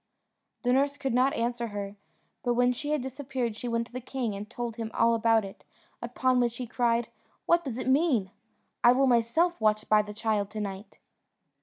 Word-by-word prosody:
The 245 0 +2
nurse 280 +2 +2
could 270 -3 -2
not 255 +3 +3
answer 235 0 -1
her; 205 -1 -5 0.5
but 245 -1 0
when 245 +1 +3
she 290 +4 -5
had 300 -4 0
disappeared 260 -3 -3
she 245 - -6
went 230 0 0
to 235 - -21
the 255 - -5
king, 245 -3 -3
and 205 +2 -7
told 240 -1 -5
him 225 -1 -4
all 230 0 +4
about 225 -1 +3
it, 195 - -11 0.4
upon 250 +1 +1
which 240 -1 0
he 250 - -4
cried, 235 -1 0 0.4
"What 340 0 +3
does 255 -6 -5
it 255 - -4
mean? 260 - +2 0.5
I 240 - +8
will 270 +2 +3
myself 255 +7 +2
watch 215 0 +2
by 215 0 +5
the 210 0 -8
child 210 -2 -1
to 215 +1 -6
night." 200 0 -6
240 Hz, 200 wpm, -28 LUFS, 220-255 Hz, 0.5 s, I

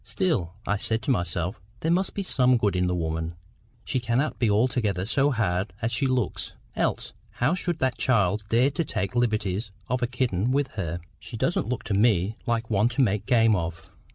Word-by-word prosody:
"Still," 130 - -1
I 100 - +1
said 110 +2 0
to 135 - +1
myself, 90 -3 -1 0.2
"there 160 - +1
must 185 +3 +1
be 200 - -1
some 130 -8 +3
good 105 -4 +1
in 90 0 +1
the 90 - 0
woman—she 85 +8 -5
cannot 120 +5 0
be 120 -3 +2
altogether 105 -3 +1
so 140 +6 +3
hard 100 -6 0
as 115 -1 -1
she 135 +4 +1
looks, 125 -6 -1 0.2
else - - -1 0.2
how 125 +7 +1
should 175 -2 -1
that 130 -4 -1
child 105 -4 +2
dare 125 +5 +3
to 155 +4 -1
take 105 -8 -2
the 120 - 0
liberties 105 -3 0 0.2
of 125 +1 0
a 120 - +1
kitten 120 -4 0
with 140 0 +1
her? 85 -6 -4 0.2
She 115 - -8
doesn't 120 - 0
look 125 - -2
to 105 - -3
ME 100 -1 +3
like 115 -1 0
one 110 +1 +2
to 125 +3 0
make 105 -3 0
game 115 -4 +4
of! 85 -2 -4
115 Hz, 200 wpm, -26 LUFS, 95-125 Hz, 0.2 s, game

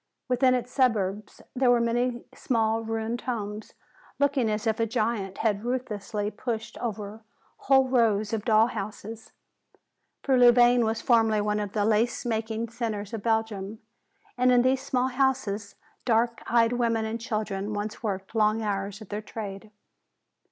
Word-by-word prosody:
Within 255 0 +3
its 250 0 -3
suburbs 215 -6 0
there 255 -1 +3
were 245 -1 +5
many 240 +1 0
small 225 -2 0
ruined 225 +1 -3
homes, 215 -3 -5 0.4
looking 275 -5 +2
as 210 +1 -2
if 220 0 0
a 225 - +1
giant 215 -4 -2
had 210 -2 0
ruthlessly 215 -4 -3
pushed 220 0 -4
over 215 -2 -5 0.4
whole 265 -1 +3
rows 225 -4 +2
of 215 -2 -1
dolls' 220 +1 +4
houses. 215 +2 -7 0.9
For 265 -2 +3
Louvain 245 0 +6
was 220 +1 -2
formerly 225 -3 +3
one 210 0 0
of 205 -1 -4
the 205 -2 +1
lace 225 +4 +1
making 225 0 -2
centers 220 -3 -4
of 225 - -4
Belgium, 220 -2 -1 0.6
and 250 0 +4
in 245 -1 +5
these 260 +1 +2
small 255 -1 0
houses 245 -6 -1 0.3
dark 235 0 +1
eyed 230 0 +3
women 230 -2 0
and 225 +1 -4
girls 215 -3 -2
once 205 +2 -4
worked 195 -3 -4
long 220 0 +2
hours 200 0 -3
at 210 - -17
their 210 +1 -4
trade. 210 -1 -7
225 Hz, 150 wpm, -27 LUFS, 210-240 Hz, 0.9 s, Louvain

